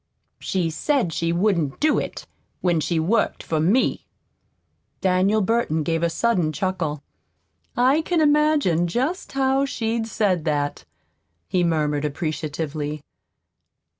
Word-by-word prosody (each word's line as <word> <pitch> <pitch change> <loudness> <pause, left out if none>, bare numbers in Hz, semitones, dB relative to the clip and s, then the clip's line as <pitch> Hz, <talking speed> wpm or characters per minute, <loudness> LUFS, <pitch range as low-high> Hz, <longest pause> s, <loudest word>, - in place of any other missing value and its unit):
"She 175 -4 -1
said 240 - 0
she 165 +2 0
wouldn't 170 -6 0
do 305 0 +3
it - - -6 0.4
when 175 -3 +2
she 165 +1 0
worked 205 +8 0
for 160 - -1
me." 195 +12 +1 0.9
Daniel 190 +3 +2
Burton 195 -7 +1
gave 165 0 -1
a 170 - +2
sudden 175 -2 +1
chuckle. 165 -5 -2 0.7
"I 260 +6 +4
can 340 +1 0
imagine 295 - +3
just 265 - -2
how 270 0 +2
she'd 230 -4 -2
say 210 -3 +1
that," 150 -3 -2 0.6
he 180 - +1
murmured 150 -3 0
appreciatively. 150 0 -3
180 Hz, 120 wpm, -23 LUFS, 160-235 Hz, 0.9 s, I